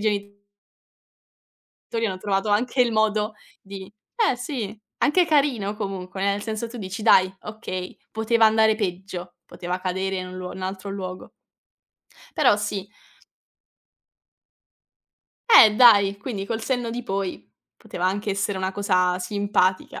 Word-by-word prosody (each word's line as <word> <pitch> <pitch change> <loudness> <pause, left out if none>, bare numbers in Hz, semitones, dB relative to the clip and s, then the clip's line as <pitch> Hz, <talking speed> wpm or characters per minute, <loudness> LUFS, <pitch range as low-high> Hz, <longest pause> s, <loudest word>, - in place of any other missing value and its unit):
geni 205 -1 -2 1.5
tori 230 -1 -1
hanno 185 -2 -4
trovato 195 +1 -1
anche 240 +5 +1
il 235 -2 0
modo 215 0 +1 0.3
di 195 0 -10 0.4
eh 255 - -1
sì, 245 -5 -5 0.2
anche 350 +4 +3
carino 260 -10 +1
comunque, 190 -2 -5
nel 200 +1 0
senso 220 +1 -4
tu 240 +1 -9
dici: 195 +2 -6
"Dai, 185 -1 +5
okay, 200 -4 -6
poteva 225 0 +3
andare 220 0 +4
peggio 185 -3 -5
poteva 180 +1 -5
cadere 190 +1 -2
in 185 0 -4
un 185 - -9
luo 180 0 -6
in 185 - -8
altro 190 +1 -5
luogo". 185 -2 -7 1.1
Però 205 - +4
sì. 205 -2 -3 2.6
Eh 215 - +8
dai, 200 -5 +6
quindi 205 -3 -5
col 225 +2 -3
senno 245 -1 -2
di 245 +1 -4
poi 195 -3 -4 0.3
poteva 180 - -6
anche 205 +2 -1
essere 195 0 -1
una 190 0 -2
cosa 185 -3 +1
simpatica. 195 -1 0
200 Hz, 135 wpm, -23 LUFS, 190-220 Hz, 2.6 s, Eh